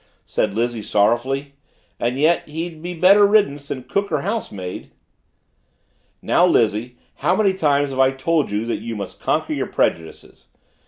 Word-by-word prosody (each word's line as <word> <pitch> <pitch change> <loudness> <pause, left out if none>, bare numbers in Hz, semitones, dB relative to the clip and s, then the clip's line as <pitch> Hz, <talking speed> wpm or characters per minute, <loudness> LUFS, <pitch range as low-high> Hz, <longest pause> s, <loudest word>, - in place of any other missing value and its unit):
said 100 - -1
Lizzie 120 0 -1
sorrowfully. 120 +7 0 0.5
"And 120 +2 -1
yet 160 +4 +2
he'd 160 +1 -6
be 175 +1 -5
better 195 +5 +6
riddance 200 -9 +2
than 130 -3 -5
cook 200 +5 -2
or 150 -3 0
housemaid." 105 - -5 1.3
"Now, 175 - +3
Lizzie, 120 -6 +1 0.2
how 170 +6 +1
many 195 -1 +2
times 145 -5 +1
have 130 - -5
I 130 0 +5
told 145 +4 0
you 105 +2 -2
that 115 - -2
you 115 -1 -5
must 100 -3 -7
conquer - - 0
your - - -2
prejudices? 80 -1 -3
140 Hz, 155 wpm, -21 LUFS, 115-170 Hz, 1.3 s, better